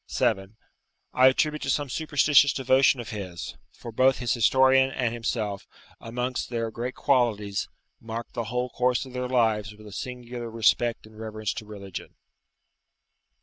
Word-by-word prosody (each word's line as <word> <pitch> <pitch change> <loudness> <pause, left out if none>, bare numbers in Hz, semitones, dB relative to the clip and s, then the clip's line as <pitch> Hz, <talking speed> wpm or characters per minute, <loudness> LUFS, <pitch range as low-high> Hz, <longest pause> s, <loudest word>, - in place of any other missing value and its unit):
7.] 95 +2 -1 0.6
I 130 +1 +6
attribute 150 +3 +2
to - - -3
some 145 +2 +1
superstitious 145 -1 +3
devotion 135 0 +3
of 120 - -6
his; 90 - -6 0.2
for 120 - -10
both 130 +3 +3
his 120 -2 0
historian 130 +2 +4
and 125 -3 -1
himself, 110 -4 -3 0.3
amongst 125 +2 -3
their 115 -2 -2
great 120 +3 -4
qualities, 105 -7 +1 0.3
marked 115 +1 -6
the 115 - -3
whole 125 +2 -2
course 125 0 +1
of 130 - -12
their 125 0 -3
lives 110 -4 +1
with 110 0 -15
a 105 - -10
singular 120 +1 -6
respect 115 +1 +1
and 110 0 -15
reverence 110 -1 -4
to 110 - -7
religion. 100 -3 -8
120 Hz, 150 wpm, -26 LUFS, 110-130 Hz, 0.6 s, I